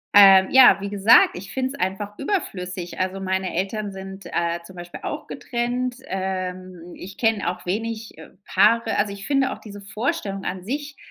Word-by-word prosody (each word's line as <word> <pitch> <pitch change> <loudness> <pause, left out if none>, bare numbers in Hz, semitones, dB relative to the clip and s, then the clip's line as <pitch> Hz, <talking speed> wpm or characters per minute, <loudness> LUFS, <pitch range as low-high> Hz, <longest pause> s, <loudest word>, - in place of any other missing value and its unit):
Ähm, 195 -2 +9
ja, 260 -1 +8
wie 200 - -4
gesagt, 205 +3 +5
ich 195 +3 -9
finde 260 0 -2
es 280 - -11
einfach 200 +2 -3
überflüssig. 185 - -4
Also, 185 +1 -1
meine 190 -1 -2
Eltern 200 +3 -2
sind, 190 0 -9
äh, 170 0 -1 0.4
auch - - -5
getrennt. 245 0 -3
Ähm, 185 -2 -5
ich 190 +2 -10
kenne 225 -3 +1
auch 180 - -6
wenig 220 +3 -3 0.3
Paare 225 +4 +3
also, 200 -1 0
ich 200 +1 -8
finde 275 -2 +2
auch - - -7
diese 205 -1 -11
Vorstellung 205 - -3
an 185 -1 -4
sich, 285 +5 -4
200 Hz, 160 wpm, -23 LUFS, 190-230 Hz, 0.4 s, Ähm